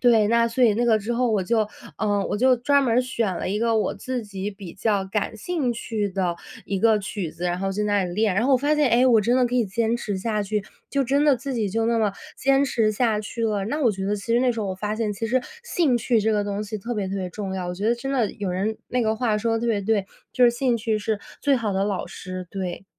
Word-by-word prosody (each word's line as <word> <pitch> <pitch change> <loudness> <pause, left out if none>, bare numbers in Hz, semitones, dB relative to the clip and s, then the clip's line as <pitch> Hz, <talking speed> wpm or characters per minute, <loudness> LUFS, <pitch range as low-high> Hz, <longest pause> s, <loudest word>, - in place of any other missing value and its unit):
对， 225 -4 +4
那 235 0 +4
所 245 +2 +2
以 220 - +5
那 240 +2 +1
个 220 -2 +4
之 215 +3 -3
后 240 0 +1
我 205 -3 +1
就， 215 +2 +1 0.3
呃， 205 -2 +1
我 - - 0
就 255 +1 +4
专 280 +4 +3
门 240 -4 +1
儿 - - +6
选 230 -7 -1
了 - - -3
一 205 - 0
个 230 0 +2
我 215 - 0
自 250 +4 -4
己 200 0 -5
比 195 -4 -10
较 200 -1 0
感 210 +3 -2
兴 300 0 -1
趣 215 -3 -2
的 180 -3 -1 0.3
一 195 -1 -2
个 225 -2 +4
曲 195 -4 -4
子， 170 +2 -7
然 175 0 0
后 195 0 -1
在 200 +2 -2
那 205 -1 +2
里 175 -1 -5
练， 210 -2 +2
然 225 +6 +2
后 275 - +3
我 - - +6
发 290 +4 +1
现， 300 -3 +3
哎， 245 +2 +4
我 230 -3 +5
真 240 +5 +2
的 255 - +4
可 245 - -3
以 240 -3 +2
坚 225 +4 0
持 210 -4 -3
下 210 +2 -1
去， 205 0 -2 0.2
就 280 -1 0
真 275 +3 +2
的 290 -3 +4
自 275 +2 -5
己 220 -4 0
就 225 +3 0
那 230 0 +2
么 215 -2 +2 0.3
坚 275 +1 +3
持 225 -5 +1
下 215 -1 +1
去 230 +2 -4
了。 205 -3 0
那 290 +8 -2
我 235 - +4
觉 190 -1 -4
得 210 - 0
其 210 +3 -3
实 240 - +4
那 255 - +3
时 230 - -3
候， 205 - -2
我 190 - -2
发 210 +3 -3
现 220 -2 -1
其 225 +3 -3
实 250 +4 +2 0.2
兴 315 - +1
趣 235 0 +2
这 220 +1 +2
个 210 -1 +1
东 205 +1 -3
西 215 +1 -5
特 235 +5 -4
别 205 -3 -2
特 195 - -4
别 185 -2 -3
重 195 +1 -5
要， 180 -2 -3
我 180 - -3
觉 200 +4 -3
得 235 - +3
真 240 +3 -5
的 245 -7 +1
有 205 -2 -4
人 200 +5 -2
那 250 -1 0
个 220 0 +1
话 220 -2 0
说 225 +2 0
得 225 - -1
特 235 - -2
别 220 -3 +1
对， 205 -1 +1 0.3
就 255 - +1
是 - - +8
“兴 240 0 +1
趣 220 -1 0
是 215 0 -2 0.2
最 285 -1 +4
好 220 -4 -1
的 195 +1 +1
老 200 -3 -2
师”， 185 0 -7
对。 190 -1 -4
220 Hz, 310 characters per minute, -24 LUFS, 200-240 Hz, 0.3 s, 是